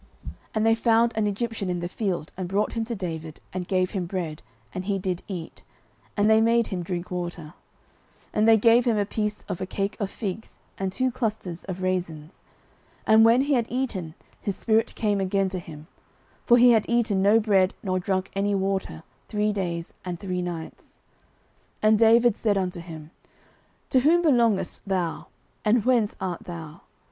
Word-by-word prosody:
09:030:011 - - -6 0.2
And 215 0 +1
they 225 - +5
found 230 0 +3
an 215 -1 +1
Egyptian 210 -1 -3
in 175 -1 -1
the 175 - -3
field, 180 -5 -3
and 185 -1 -4
brought 200 +2 0
him 230 - -1
to 235 +1 -4
David, 160 -5 -6
and 180 -1 -4
gave 185 -1 +1
him 185 -4 -3
bread, 170 -4 -4 0.3
and 185 0 -4
he 200 -1 0
did 185 -2 -2
eat; 175 -5 -7 0.6
and 205 0 +3
they 220 0 +5
made 230 +1 +3
him 185 -3 -3
drink 175 +1 -5
water; 175 -1 -4
09:030:012 150 - -12 0.8
And 215 +1 +2
they 225 -1 +7
gave 230 +3 +5
him 230 -3 +2
a 205 - +1
piece 210 0 -3
of 180 - -5
a 185 - -3
cake 195 +2 -2
of 200 -3 -1
figs, 210 0 -6 0.2
and 190 -1 -1
two 255 +6 0
clusters 215 -8 -3
of 185 -1 -5
raisins: 175 -4 -3 0.6
and 220 +1 +6
when 230 +3 +6
he 285 +1 +1
had 235 -3 +1
eaten, 200 -11 -3 0.3
his 200 - -2
spirit 225 0 +1
came 205 -3 0
again 195 0 +1
to 185 -1 -4
him: 155 -3 -11 0.6
for 240 - +7
he 245 0 +7
had 220 -3 +3
eaten 230 -5 +2
no 205 +3 +5
bread, 195 -3 +2
nor 185 -2 0
drunk 185 0 -2
any 200 +1 0
water, 190 - -2 0.3
three 210 0 0
days 170 -4 -3
and 175 -2 -5
three 180 -1 -3
nights. 170 -2 -7 0.8
09:030:013 215 - +5
And 215 -1 +4
David 230 0 +5
said 210 -3 +1
unto 180 -2 -2
him, 160 -2 -10 0.8
To 260 - +5
whom 330 +6 +4
belongest 235 - +2
thou? 180 -4 -2 0.4
and 215 +1 +2
whence 240 -5 +2
art 185 -3 -4
thou? 165 -1 -8
195 Hz, 190 wpm, -25 LUFS, 180-225 Hz, 0.8 s, they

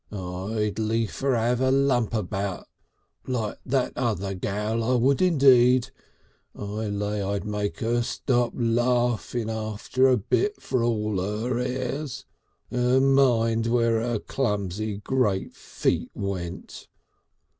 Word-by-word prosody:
"I'd 100 +3 -3
liefer 115 +4 0
'ave 120 +2 +1
a 130 - +3
lump 130 -4 +2
about 100 -2 -3 0.6
like 115 -5 -2
that 130 0 0
other 105 -6 -1
gal. 105 +4 -2
I 125 +3 +2
would 130 +5 +2
indeed. 130 -6 +5 0.6
I 105 +2 -4
lay 105 0 -2
I'd 100 +1 -2
make 105 +1 -3
'er 120 +1 +1
stop 120 0 0
laughing 120 -1 0
after 110 +4 0
a 130 -1 +4
bit 405 - 0
for 130 -2 -1
all 105 -4 0
'er 110 +5 -2
airs. 130 +2 -3 0.5
And 125 +2 +3
mind 115 -4 +3
where 115 -1 +2
her 120 -1 -1
clumsy 105 -3 -2
great 105 -3 0
feet - - -2
went.... 95 -2 -5
115 Hz, 120 wpm, -25 LUFS, 105-125 Hz, 0.6 s, indeed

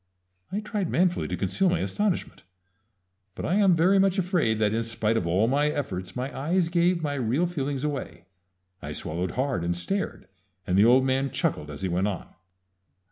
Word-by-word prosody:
_" - - 0
I - - -1
tried 210 -4 -3
manfully 180 0 +1
to - - -3
conceal 195 -1 +1
my 175 - +1
astonishment; 205 -3 -2 0.9
but - - -5
I 170 - 0
am 195 -4 +5
very 185 +4 +4
much 195 0 +3
afraid 175 - +1
that 105 -1 +1
in 115 - +1
spite 115 -1 -1
of 90 -7 0
all 95 +6 +2
my 145 +4 +2
efforts 95 -11 -4
my 130 +2 -4
eyes 165 +5 0
gave 170 0 +2
my 145 -1 -1
real 135 +5 +1
feelings 145 -5 -3
away. 140 -11 -4 0.6
I - - -6
swallowed 85 +3 -4
hard, 130 -8 -1
and 85 0 -1
stared, 195 - -3 0.4
and 90 - 0
the 100 +3 +6
old 130 +3 +5
man 135 +1 +1
chuckled 75 - -1
as 75 +5 -7
he - - +1
went 90 +3 0
on. 100 -4 -4
135 Hz, 190 wpm, -26 LUFS, 105-175 Hz, 0.9 s, the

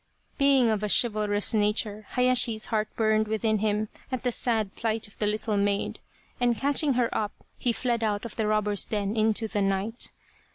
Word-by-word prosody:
Being 275 -3 +4
of 215 -2 0
a 210 - -2
chivalrous 210 -2 +2
nature 210 0 0
Hayashi's 250 -3 +2
heart 215 -1 +1
burned 215 -1 +2
within 220 0 0
him 215 0 0 0.2
at 255 -1 -3
the 250 - +1
sad 220 -4 0
plight 225 -2 -1
of 205 - -19
the 210 - +1
little 215 0 0
maid, 200 0 0 0.4
and 240 -2 +2
catching 285 +1 +2
her 245 -1 0
up 210 -1 -1 0.3
he 245 - +1
fled 235 -1 -1
out 210 0 -1
of 235 - -7
the 220 -2 -1
robber's 210 -1 +1
den 205 0 -2
into 220 0 +1
the 210 -1 -1
night. 195 +4 -1
215 Hz, 180 wpm, -27 LUFS, 210-235 Hz, 0.4 s, Being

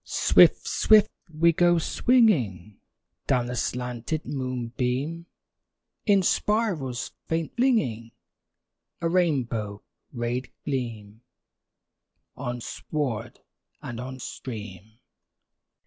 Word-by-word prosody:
Swift, - - +4
swift 215 -1 +5 0.2
we 165 +2 +3
go 175 +1 +4
swinging 140 - +2 0.5
Down 125 -2 +2
the 125 0 -4
slanted 125 +5 -3
moonbeam, 130 +4 -3 0.8
In 200 -2 +5
spirals 175 - 0 0.2
faint 165 -1 -2
flinging 135 - +1 0.9
A 165 - 0
rainbow 125 - 0 0.3
rayed 120 +1 -3
gleam 115 -5 -4 1.1
On 120 -2 -4
sward 120 -3 -4 0.4
and 120 -1 -6
on 130 +1 -6
stream. 110 -5 -8
130 Hz, 85 wpm, -26 LUFS, 115-165 Hz, 1.1 s, swift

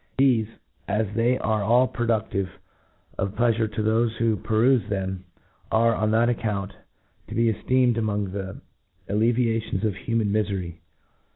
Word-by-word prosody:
Thefe, 125 -5 +3 0.4
as 110 +1 +1
they 120 +3 +2
are 110 -1 0
all 120 +5 +4
produftive 110 -5 -1 0.7
of 95 +1 -2
pleafurc 115 -1 +1
to 110 - -1
thofe 110 +1 +2
who 115 -1 +1
per 110 +3 0
ufe 125 -5 +3
them, 95 -2 -3 0.5
are, 115 +1 +4
on 105 0 0
that 115 +2 +3
account, 105 -4 -2 0.5
to - - -7
be 115 0 +3
eftecmcd 125 +1 +2
among 105 -3 -1
the 95 0 -6 0.5
alleviations 115 -1 0
of 105 -3 0
human 115 0 -1
mlfery. 95 -5 -2
110 Hz, 145 wpm, -25 LUFS, 100-115 Hz, 0.7 s, all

